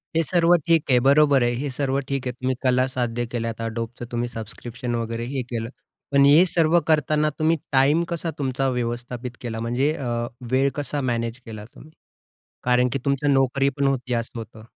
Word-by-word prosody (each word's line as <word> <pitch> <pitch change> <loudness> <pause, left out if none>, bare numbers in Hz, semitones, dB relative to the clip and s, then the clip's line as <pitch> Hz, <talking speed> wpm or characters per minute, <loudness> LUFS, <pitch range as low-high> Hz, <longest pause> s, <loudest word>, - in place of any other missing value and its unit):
हे 165 - +4
सर्व 170 +2 +3
ठीक 165 -2 +4
आहे. 125 - +6
बरोबर 140 -2 +5
आहे. 120 - +2
हे 140 +3 -3
सर्व 135 +1 -1
ठीक 135 -2 -2
आहे. 125 - -1
तुम्ही 130 +1 -2
कला 130 0 +3
साध्य 120 -2 -2
केल्या 115 -1 -2 0.2
Adobeच 115 +1 -5
तुम्ही 120 0 -1
सबस्क्रिप्शन 120 +2 -6
वगैरे 115 0 -3
हे 135 0 -2
केलं. 115 -1 -3 0.4
पण 140 0 +5
हे 150 +6 +7
सर्व 170 -1 +3
करतांना 155 0 +2
तुम्ही 160 +1 +2
टाईम 140 +5 +4
कसा 170 -1 -3
तुमचा 135 -1 -1
व्यवस्थापित 120 0 -4
केला? 115 -2 -4
म्हणजे 120 +6 0 0.6
वेळ 135 +2 +3
कसा 145 0 -3
मॅनेज 120 -1 -2
केला 110 -2 -8
तुम्ही? 145 +7 -16 0.7
कारण 125 0 +3
की - - 0
तुमच्या 140 +1 +1
नोकरी 135 +1 +2
पण 140 -1 +1
होती 130 -2 -1
असं 115 0 -3
होतं. 110 -1 -9
130 Hz, 180 wpm, -23 LUFS, 120-140 Hz, 0.7 s, हे